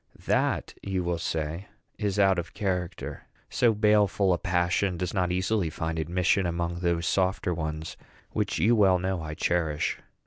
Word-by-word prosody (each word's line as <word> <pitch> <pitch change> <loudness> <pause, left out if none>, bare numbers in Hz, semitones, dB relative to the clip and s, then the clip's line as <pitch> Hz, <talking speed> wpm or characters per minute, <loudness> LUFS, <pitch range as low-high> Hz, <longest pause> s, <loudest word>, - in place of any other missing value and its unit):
That, - - +1
you 95 -2 -2
will 85 -1 -1
say, 80 +3 -3 0.3
is 105 -2 -1
out 95 -2 +4
of 85 - -7
character. 90 -4 -3 0.2
So 115 -3 +3
baleful 105 -2 +3
a 85 - -1
passion 90 +1 +1
does 90 0 -3
not 90 -3 +1
easily 95 0 0
find 80 0 -3
admission 90 +3 +1
among 85 0 -2
those 85 -1 0
softer 95 0 +1
ones 80 -1 -4 0.3
which - - -1
you 115 +3 +4
well 95 -4 +5
know 95 -1 -2
I 80 -1 -5
cherish. 80 -3 0
90 Hz, 160 wpm, -27 LUFS, 85-95 Hz, 0.3 s, well